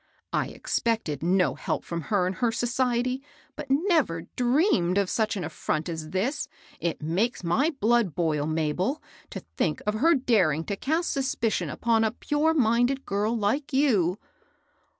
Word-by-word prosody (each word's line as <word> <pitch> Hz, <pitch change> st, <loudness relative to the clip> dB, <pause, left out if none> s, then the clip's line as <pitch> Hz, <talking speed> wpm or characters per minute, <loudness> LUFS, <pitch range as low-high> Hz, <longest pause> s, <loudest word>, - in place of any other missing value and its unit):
" -, -, -57 dB
I -, -, +1 dB
expected 220 Hz, -, -2 dB
no 175 Hz, -4 st, +2 dB
help -, -, -3 dB
from 170 Hz, -1 st, -4 dB
her 200 Hz, -4 st, +2 dB
and 185 Hz, +1 st, -2 dB
her 240 Hz, -2 st, +1 dB
society, 250 Hz, +2 st, 0 dB, 0.3 s
but 300 Hz, -1 st, -7 dB
never 280 Hz, -, +2 dB
dreamed 250 Hz, -, +2 dB
of 200 Hz, -2 st, +1 dB
such 220 Hz, -1 st, 0 dB
an 185 Hz, -, -3 dB
afiront 155 Hz, 0 st, -3 dB
as 160 Hz, -2 st, -5 dB
this! 205 Hz, -, -1 dB, 0.3 s
It 170 Hz, -2 st, -3 dB
makes 185 Hz, +9 st, 0 dB
my 175 Hz, -, +2 dB
blood 225 Hz, -7 st, +2 dB
boil, 155 Hz, -4 st, 0 dB
Mabel, 160 Hz, -, -1 dB, 0.3 s
to -, -, -6 dB
think -, -, -2 dB
of 210 Hz, -, +1 dB
her 320 Hz, +10 st, +4 dB
daring 190 Hz, -, +2 dB
to 200 Hz, -, -3 dB
cast 320 Hz, -, -1 dB
suspicion 265 Hz, -5 st, -1 dB
upon 230 Hz, -1 st, +1 dB
a 220 Hz, -, +3 dB
pure 305 Hz, +5 st, 0 dB
minded 245 Hz, +1 st, +2 dB
girl 210 Hz, +4 st, 0 dB
like 245 Hz, +8 st, -1 dB
you 210 Hz, -, +2 dB
220 Hz, 160 wpm, -26 LUFS, 175-265 Hz, 0.3 s, her